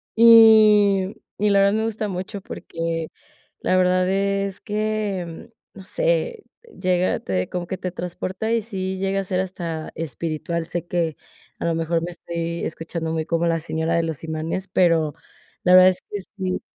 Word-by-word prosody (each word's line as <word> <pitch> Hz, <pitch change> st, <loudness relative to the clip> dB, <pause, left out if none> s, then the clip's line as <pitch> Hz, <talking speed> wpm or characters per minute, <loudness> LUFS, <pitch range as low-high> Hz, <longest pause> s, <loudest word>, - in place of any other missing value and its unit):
Y 215 Hz, -4 st, +7 dB, 0.2 s
y 210 Hz, +1 st, +3 dB
la 200 Hz, -, +4 dB
verdad, 200 Hz, 0 st, +4 dB
me 220 Hz, +1 st, 0 dB
gusta 220 Hz, -1 st, -2 dB
mucho 190 Hz, +2 st, -5 dB
porque 165 Hz, -2 st, -4 dB, 0.5 s
la -, -, +1 dB
verdad 185 Hz, 0 st, +3 dB
es 195 Hz, 0 st, -1 dB
que, 210 Hz, -5 st, -3 dB, 0.2 s
no 195 Hz, -, -11 dB
sé, -, -, -1 dB, 0.4 s
llega 180 Hz, -1 st, +1 dB
te 90 Hz, -1 st, -2 dB
como 180 Hz, -1 st, -3 dB
que 185 Hz, -, -4 dB
te 185 Hz, -2 st, -3 dB
transporta, 185 Hz, +4 st, -4 dB
y 230 Hz, -, +2 dB
sí 190 Hz, -3 st, -4 dB
llega 195 Hz, 0 st, 0 dB
a -, -, -5 dB
ser 185 Hz, -1 st, -2 dB
hasta 170 Hz, -4 st, -4 dB
espiritual. 165 Hz, +2 st, -3 dB
Sé 175 Hz, 0 st, -4 dB
que, 170 Hz, -3 st, -1 dB, 0.4 s
a -, -, -3 dB
lo 170 Hz, -, +1 dB
mejor 165 Hz, 0 st, 0 dB
me 175 Hz, -, -4 dB
estoy 170 Hz, 0 st, -4 dB
escuchando, 165 Hz, 0 st, -4 dB
muy 160 Hz, -1 st, -2 dB
como 170 Hz, +1 st, 0 dB
la 165 Hz, 0 st, +1 dB
señora 160 Hz, +1 st, -1 dB
de 170 Hz, -, +2 dB
los 160 Hz, -2 st, -4 dB
imanes, 160 Hz, +4 st, -3 dB
pero 165 Hz, -4 st, +2 dB, 0.5 s
la 180 Hz, -, +4 dB
verdad 185 Hz, 0 st, +9 dB
es 185 Hz, -, -3 dB
que 205 Hz, -, -4 dB, 0.2 s
sí. 185 Hz, -1 st, -2 dB
185 Hz, 170 wpm, -22 LUFS, 165-200 Hz, 0.5 s, verdad